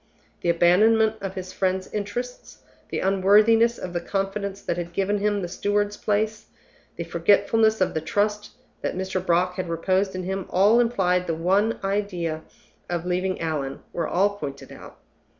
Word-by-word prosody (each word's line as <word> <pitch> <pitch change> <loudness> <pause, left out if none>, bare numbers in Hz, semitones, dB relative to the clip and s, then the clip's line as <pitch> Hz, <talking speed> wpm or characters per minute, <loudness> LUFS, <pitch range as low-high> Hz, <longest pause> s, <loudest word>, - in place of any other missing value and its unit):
The 175 - 0
abandonment 215 +6 +4
of 195 -1 -5
his 185 0 -6
friend's 185 0 -1
interests, 215 +5 -5 0.3
the - - -2
unworthiness 210 +5 +4
of 180 - -6
the 175 - -2
confidence 195 +1 -3
that - - -1
had 175 0 -5
given 200 +2 0
him 205 -1 0
the - - -2
steward's 205 +3 -1
place, 210 +1 -1 0.5
the 170 - -4
forgetfulness 205 +6 +2
of 185 - +2
the 160 - -2
trust 210 +3 -1 0.3
that - - -2
Mr. 190 -1 -2
Brock 180 +1 +1
had 185 -2 -3
reposed 185 +3 0
in 185 - -4
him 190 0 -4
all 205 +5 +4
implied 190 -7 +2
in 180 - -11
the 165 - -1
one 195 +7 +1
idea 185 -5 -2 0.5
of 175 -1 -2
leaving 185 +1 -1
Allan 150 -5 -3
were 170 -2 -2
all 200 +3 +1
pointed 140 -4 -7
out. - - -12
190 Hz, 170 wpm, -24 LUFS, 175-205 Hz, 0.5 s, abandonment